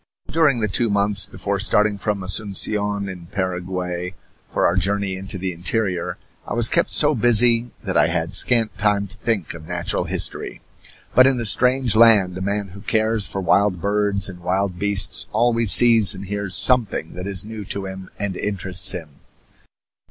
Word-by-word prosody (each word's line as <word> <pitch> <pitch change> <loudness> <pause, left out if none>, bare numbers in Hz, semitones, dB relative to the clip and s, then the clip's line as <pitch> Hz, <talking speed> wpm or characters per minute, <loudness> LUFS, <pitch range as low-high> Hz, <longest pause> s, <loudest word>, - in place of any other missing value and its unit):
During 150 -7 +1
the 105 - 0
two 115 +3 -1
months 100 -1 +1
before 100 0 -4
starting 105 +1 +1
from 100 -2 -3
Asuncion, 100 +1 0
in 90 -3 -10
Paraguay, 90 -1 -5 0.3
for - - -2
our - - +1
journey 100 +1 -1
into 95 +1 -5
the 95 0 -3
interior, 90 +1 -3 0.3
I - - -5
was 120 -1 +2
kept 170 - 0
so 150 0 +5
busy 120 0 +2
that - - -5
I - - +3
had - - -3
scant 115 -3 +3
time 105 -1 0
to 100 +3 -13
think 105 -5 -3
of 80 -1 -12
natural - - -3
history. - - -3 0.5
But 130 +1 +5
in 135 -2 0
a 115 - -3
strange 125 +2 +2
land 110 -5 +4
a 95 - -7
man 100 +1 -3
who 100 +3 -13
cares 110 -1 +1
for 95 - -6
wild 95 0 +1
birds 100 0 -1
and 90 -2 -9
wild 90 +1 -3
beasts 100 -2 0
always 115 -1 +2
sees 115 -4 +7
and 95 +1 -9
hears 100 -1 -2
something 115 -10 +2
that 90 +2 -8
is 100 -1 -2
new 110 -1 -8
to 100 +1 -5
him 95 0 -9
and 100 -2 -4
interests 95 -2 +1
him. 80 -6 -10
100 Hz, 175 wpm, -20 LUFS, 95-110 Hz, 0.5 s, sees